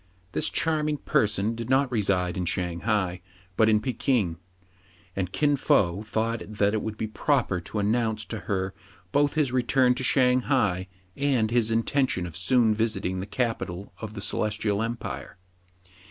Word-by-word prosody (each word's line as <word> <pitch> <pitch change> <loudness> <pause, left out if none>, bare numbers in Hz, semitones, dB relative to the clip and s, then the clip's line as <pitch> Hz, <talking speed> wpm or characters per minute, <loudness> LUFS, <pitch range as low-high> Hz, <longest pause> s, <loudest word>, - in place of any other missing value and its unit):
This - - +2
charming 150 -2 0
person 105 -3 +1
did 115 +1 -6
not 130 0 +3
reside 95 -5 +1
in 90 -2 -2
Shang 85 -1 -1
hai, 95 -5 -1 0.3
but 110 +2 +4
in 110 - +5
f 105 - 0
ekin; 120 - 0 0.8
and 95 -2 -2
Kin 145 +4 +2
Fo 95 -8 +2
thought 110 +1 -2
that 105 -1 +1
it 110 - 0
would 110 -1 -5
be - - -2
proper 110 - 0
to 105 - -7
announce 110 +1 0
to 110 - -5
her 95 -2 -1 0.4
both 145 +4 +2
his 150 -5 +1
return 125 0 +3
to 130 - -3
Shang 125 -1 +4
hai, 105 -7 +1 0.3
and 130 -6 +1
ihis 115 -2 +2
inten 130 +4 +1
tion 90 - -2
of 85 - -8
soon 110 +4 +3
visiting 105 -4 -1
the 95 - -5
capital 105 -6 -3
of 110 -1 -6
:the 100 - -4
Celestial 105 0 0
Empire. 115 -3 -5
110 Hz, 170 wpm, -26 LUFS, 100-125 Hz, 0.8 s, in